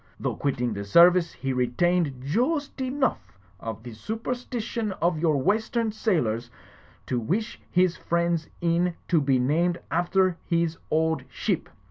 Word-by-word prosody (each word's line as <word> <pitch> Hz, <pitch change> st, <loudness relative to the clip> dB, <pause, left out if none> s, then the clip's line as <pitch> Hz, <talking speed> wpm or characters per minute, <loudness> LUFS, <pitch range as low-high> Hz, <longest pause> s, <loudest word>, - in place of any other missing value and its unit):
Though -, -, -2 dB
quitting 125 Hz, -4 st, -1 dB
the 100 Hz, 0 st, -4 dB
service, 170 Hz, -, +6 dB
he 135 Hz, +1 st, -3 dB
retained 130 Hz, +3 st, +1 dB
joost 270 Hz, -, 0 dB
enough 260 Hz, -, -1 dB, 0.2 s
of 110 Hz, 0 st, -6 dB
the 120 Hz, -1 st, -8 dB
superstition 225 Hz, -, -3 dB
of 170 Hz, -3 st, 0 dB
your 155 Hz, -3 st, +2 dB
western 220 Hz, -, +1 dB
sailors, 125 Hz, -, 0 dB, 0.6 s
to 125 Hz, -, -1 dB
wish 195 Hz, -, -2 dB
his 180 Hz, -1 st, +2 dB
friend's 170 Hz, -1 st, 0 dB
inn 170 Hz, +1 st, +1 dB
to 165 Hz, -4 st, +4 dB
be 135 Hz, -2 st, +3 dB
named 165 Hz, +7 st, +1 dB
after 180 Hz, +1 st, +2 dB
his 170 Hz, -1 st, 0 dB
old 160 Hz, +1 st, +1 dB
ship. -, -, -2 dB
170 Hz, 135 wpm, -26 LUFS, 135-200 Hz, 0.6 s, service